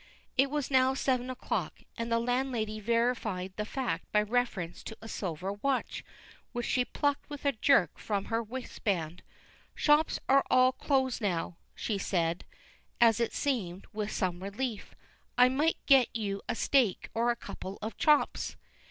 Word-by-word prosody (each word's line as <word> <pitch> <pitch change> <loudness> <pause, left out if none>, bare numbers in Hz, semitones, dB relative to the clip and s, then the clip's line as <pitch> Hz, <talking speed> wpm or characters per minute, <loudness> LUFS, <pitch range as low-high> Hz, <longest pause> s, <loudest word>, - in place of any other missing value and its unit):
It 270 +1 +4
was 290 -1 -2
now 260 0 +4
seven 255 -2 0
o'clock, 255 0 -3
and 230 0 -4
the 230 - +4
landlady 235 -3 -1
verified 220 -4 0
the 210 - -3
fact 235 -11 -3
by 210 0 +3
reference 210 -6 -1
to 220 - -7
a 225 - -10
silver 185 -2 -3
watch, 260 +6 -2 0.5
which 240 -1 -2
she 250 - +2
plucked 285 +2 -1
with 290 -1 -8
a 280 - +4
jerk 220 - +3
from 200 -2 -2
her 225 0 0
waistband. 200 -8 -3 0.5
"Shops 300 +1 +3
are 275 +1 +5
all 255 0 +5
closed 265 -2 0
now," 175 -4 -1 0.2
she 205 -3 -2
said, 170 -3 -1 0.5
as 230 -2 +5
it 235 - +1
seemed, 200 -10 -2
with 210 0 -2
some 180 -2 -1
relief. 205 +3 -4 0.4
"I 250 0 +7
might 295 +6 +1
get 270 -4 +6
you 200 -3 -2
a - - 0
steak, 245 -6 +2
or 235 +1 +1
a 240 - +2
couple 195 -3 -8
of 220 - -4
chops." 300 -2 +2
230 Hz, 160 wpm, -30 LUFS, 200-260 Hz, 0.5 s, I